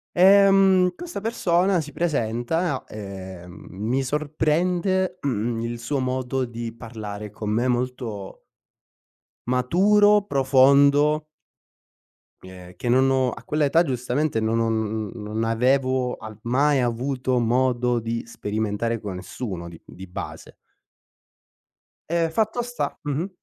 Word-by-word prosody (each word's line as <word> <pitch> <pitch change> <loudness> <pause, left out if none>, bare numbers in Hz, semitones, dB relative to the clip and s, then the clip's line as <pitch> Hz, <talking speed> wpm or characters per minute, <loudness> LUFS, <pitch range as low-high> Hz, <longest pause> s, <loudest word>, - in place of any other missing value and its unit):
Ehm, 195 -1 +6
questa 345 - -7
persona 185 -5 +1
si 150 - -9
presenta, 145 0 -1
ehm, 95 -4 -9
mi 110 +8 -1
sorprende, 170 +6 0
mhmm, 120 -3 -1
il 115 +1 -3
suo 135 +4 -2
modo 130 0 -1
di 115 -1 -6
parlare 110 -3 -7
con 105 +1 -5
me, 120 +4 +1
molto 120 -5 -3 1.0
maturo, 200 +11 +4
profondo 140 +2 +4 1.2
ehm, 90 -1 -12
che 120 - -5
non 130 +2 +4
ho 130 -2 +2
a 115 - -10
quell'età 150 +4 +2
giustamente, 130 -1 -1
non 110 +1 0
ho 115 0 +1
non 110 -1 -2
n 115 - -9
non 110 +2 -3
avevo 130 +2 +1
a 110 -1 -10
mai 140 +4 +2
avuto 125 +1 -1
modo 125 0 +1
di 115 +1 -3
sperimentare 110 +1 -2
con 100 -3 -6
nessuno 95 -1 -6
di 85 -1 -11
di 95 +1 -11
base 90 - -8 1.5
ehm, 165 0 +1
fatto 220 +5 0
sta 245 0 -4
mh-mh. 150 +5 -2
125 Hz, 120 wpm, -24 LUFS, 115-155 Hz, 1.5 s, Ehm